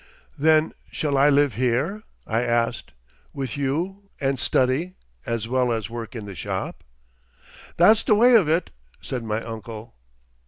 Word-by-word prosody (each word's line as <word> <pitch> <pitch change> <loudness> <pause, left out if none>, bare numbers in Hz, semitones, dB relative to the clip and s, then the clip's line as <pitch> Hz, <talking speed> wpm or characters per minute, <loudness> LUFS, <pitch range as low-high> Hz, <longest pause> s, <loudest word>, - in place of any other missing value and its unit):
"Then 155 +1 +3 0.2
shall 145 -2 -1
I 140 +2 +5
live 145 -2 +3
here?" 130 - 0 0.2
I 115 +1 0
asked, 120 -1 -1 0.4
"with 135 -5 -4
you, 175 +9 -3
and 135 -1 0
study... 135 +11 +1 0.3
as 115 -1 -2
well 125 0 +1
as 110 -3 -3
work 115 0 -6
in 110 -3 -6
the 100 - -7
shop?" - - -5 0.9
"That's 210 +6 +6
the 215 - +3
way 245 +4 +6
of 200 -10 +5
it," 165 +2 +1 0.3
said 125 -3 -5
my 110 0 -2
uncle. 115 0 -8
130 Hz, 150 wpm, -24 LUFS, 115-160 Hz, 0.9 s, That's